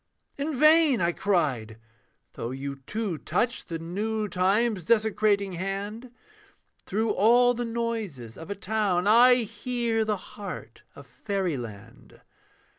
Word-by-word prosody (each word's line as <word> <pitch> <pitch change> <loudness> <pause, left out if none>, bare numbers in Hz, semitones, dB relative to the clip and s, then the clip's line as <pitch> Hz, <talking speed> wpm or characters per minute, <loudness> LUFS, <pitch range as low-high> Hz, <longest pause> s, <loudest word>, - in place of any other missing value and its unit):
'In 285 +1 -3
vain,' 305 -2 +5
I 170 0 +2
cried, 140 - -1 0.6
'though 115 - -5
you 140 +2 -5
too 210 -7 -3
touch 240 0 -1
The 165 - -4
new 210 +6 -3
time's 195 +2 +1
desecrating 215 -2 +2
hand, 200 +6 -5 0.8
Through 220 +3 0
all 240 +4 +4
the 240 0 -3
noises 225 - -4
of 165 - -10
a 200 - -3
town 200 -3 0
I 245 +3 +6
hear 235 0 -1
the 215 -1 -1
heart 200 0 -9
of - - -12
fairyland.' 125 - -5
205 Hz, 120 wpm, -26 LUFS, 175-230 Hz, 0.8 s, I